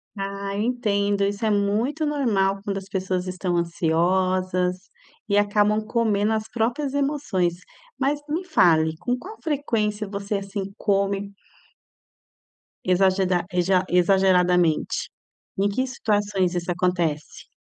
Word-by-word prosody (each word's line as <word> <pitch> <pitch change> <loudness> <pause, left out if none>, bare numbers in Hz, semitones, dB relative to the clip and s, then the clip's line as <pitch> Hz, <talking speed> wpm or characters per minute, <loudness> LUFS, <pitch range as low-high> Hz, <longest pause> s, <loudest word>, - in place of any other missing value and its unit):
Ah, 200 0 -4
eu 205 - -1
entendo, 205 -4 0
isso 200 +2 -2
é - - +2
muito 215 +10 0
normal 210 -10 +1
quando 200 -1 -2
as 195 -1 -7
pessoas 185 -1 -2
estão 180 -1 -2
ansiosas 180 +2 +1 0.5
e 200 - +3
acabam 210 +1 +2
comendo 220 -2 +1
as 220 0 -2
próprias 245 +5 -1
emoções. 275 - 0 0.5
Mas 280 +2 +1
me 320 +5 -2
fale, 160 - +3
com 245 +5 -1
qual 410 - -10
frequência 220 -9 -1
você, 200 +1 -3
assim, 195 0 -4
come 200 -1 0 1.5
exageda 185 0 +2
exa 180 +1 +2
exageradamente? 180 -2 +3 0.6
Em 200 - +3
que 255 +6 0
situações 205 -6 0
isso 175 0 -2
acontece? 170 -4 -2
200 Hz, 120 wpm, -24 LUFS, 185-220 Hz, 1.5 s, e